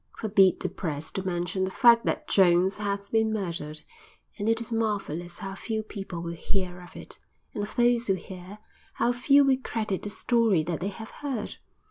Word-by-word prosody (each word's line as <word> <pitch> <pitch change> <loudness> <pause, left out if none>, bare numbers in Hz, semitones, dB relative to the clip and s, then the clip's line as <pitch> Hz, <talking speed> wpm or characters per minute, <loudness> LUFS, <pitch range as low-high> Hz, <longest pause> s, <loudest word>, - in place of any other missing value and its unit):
Forbid 195 -4 +4
the - - 0
Press 155 -4 -4
to 190 - -3
mention 175 0 -1
the 190 - 0
fact 235 +4 +5
that - - -1
Jones 185 0 +4
has 200 -1 -3
been 220 -1 +2
murdered, 170 -7 -4 0.6
and 205 +2 0
it 225 0 +2
is 230 0 -5
marvelous 195 -6 -2
how 195 0 -6
few 220 +2 -3
people 195 -5 -6
will 170 0 -4
hear 180 +1 -3
of 175 - -14
it, - - -10 0.3
and 205 - -3
of 205 - -7
those 240 -1 +3
who 195 - +3
hear 185 +2 -9 0.4
how 235 +1 +2
few 275 +3 +5
will 265 -1 +3
credit 215 -4 -2
the 205 - -5
story 225 -6 +2
that 165 0 -3
they 185 - -2
have 220 +3 -7
heard. 265 -7 -5
200 Hz, 190 wpm, -27 LUFS, 180-225 Hz, 0.6 s, fact